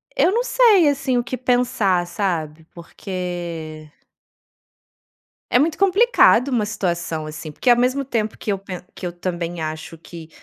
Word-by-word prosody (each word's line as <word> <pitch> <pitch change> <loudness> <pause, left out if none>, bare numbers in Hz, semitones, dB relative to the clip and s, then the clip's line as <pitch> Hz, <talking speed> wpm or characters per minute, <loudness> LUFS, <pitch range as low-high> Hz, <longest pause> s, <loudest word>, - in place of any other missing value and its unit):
eu - - +3
não 470 +4 +1
sei, 440 -11 +5
assim, 270 -3 0
o 240 - +1
que 255 - -5
pensar, 245 -8 +1
sabe. 165 -4 -3
Porque 170 -3 -6 1.6
é 245 - +4
muito 315 +3 +1
complicado 395 - +4
uma 235 -5 0
situação 175 -6 -3
assim, 155 0 -8
porque 245 - -1
ao 240 - +6
mesmo 255 +3 +1
tempo 225 -5 -2
que 210 - -3
eu 200 - -1
pe 190 -2 -8
que - - -7
eu 175 - -3
também 175 -1 -4
acho 155 +1 -6
que 165 0 -12
195 Hz, 155 wpm, -21 LUFS, 170-255 Hz, 1.6 s, ao